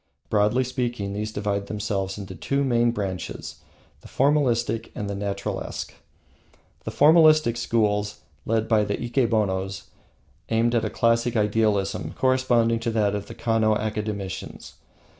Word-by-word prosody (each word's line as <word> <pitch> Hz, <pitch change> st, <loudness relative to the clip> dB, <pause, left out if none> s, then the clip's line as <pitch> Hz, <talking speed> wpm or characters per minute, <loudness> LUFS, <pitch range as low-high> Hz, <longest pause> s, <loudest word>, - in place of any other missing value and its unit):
Broadly 105 Hz, +4 st, +3 dB
speaking, 120 Hz, -5 st, -3 dB
these 105 Hz, +1 st, -3 dB
divide 100 Hz, -1 st, -2 dB
themselves 100 Hz, -2 st, -3 dB
into 100 Hz, -2 st, -7 dB
two 140 Hz, -, -1 dB
main 120 Hz, -3 st, +2 dB
branches, 95 Hz, -7 st, -4 dB, 0.4 s
the -, -, -14 dB
Formalistic 130 Hz, -5 st, +1 dB
and 105 Hz, -, -4 dB
the 100 Hz, -, -3 dB
Naturalesque. 100 Hz, 0 st, -4 dB, 0.9 s
The -, -, -3 dB
Formalistic 155 Hz, -4 st, +5 dB
schools, 105 Hz, -3 st, 0 dB, 0.2 s
led 110 Hz, 0 st, 0 dB
by 110 Hz, -2 st, +3 dB
the 100 Hz, 0 st, -2 dB
Ikenobos, 105 Hz, -6 st, 0 dB, 0.7 s
aimed 115 Hz, +1 st, +2 dB
at 115 Hz, -, +1 dB
a -, -, -1 dB
classic 115 Hz, +1 st, +1 dB
idealism 105 Hz, -2 st, 0 dB
corresponding 130 Hz, -3 st, +2 dB
to 115 Hz, -, -2 dB
that 105 Hz, -3 st, +1 dB
of 105 Hz, -1 st, -4 dB
the -, -, -9 dB
Kano 110 Hz, -2 st, +1 dB
academicians. 105 Hz, -3 st, -4 dB
110 Hz, 130 wpm, -24 LUFS, 105-120 Hz, 0.9 s, Formalistic